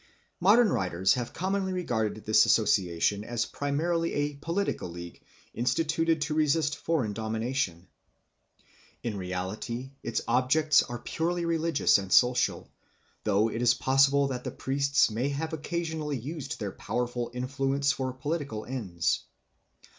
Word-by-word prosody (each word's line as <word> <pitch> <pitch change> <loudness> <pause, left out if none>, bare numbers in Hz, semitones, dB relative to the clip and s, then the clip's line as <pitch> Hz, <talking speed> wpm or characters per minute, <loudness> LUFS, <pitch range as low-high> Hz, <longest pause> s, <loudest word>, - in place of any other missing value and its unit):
Modern 210 +5 +5
writers 95 - +1
have 120 -2 -3
commonly 190 +1 -1
regarded 110 - -2
this 110 0 +5
association 100 -2 +2
as 120 +1 -2
primarily 165 +4 -1
a 145 0 -1
political 165 - -2
league 85 0 -9 0.3
instituted 160 +6 +1
to 150 +1 -1
resist 150 0 +2
foreign 130 -11 -1
domination. 110 -4 -2 1.2
In 115 -3 -2
reality 95 +7 -4
its 120 - -2
objects 135 +6 +4
are 120 - -5
purely 170 +6 -2
religious 165 -8 +3
and 95 -1 -7
social, 125 0 +3 0.6
though 105 +1 +3
it 115 - -3
is 120 -1 +4
possible 135 +1 +3
that 125 -2 -4
the - - -3
priests 140 -2 +1
may 120 +6 -1
have 160 +3 -3
occasionally 160 -2 -3
used 145 +5 -6
their 105 -3 -3
powerful 120 +2 -3
influence 135 +2 0
for 130 -1 -2
political 135 -4 -4
ends. 100 -10 -2
130 Hz, 130 wpm, -28 LUFS, 110-155 Hz, 1.2 s, Modern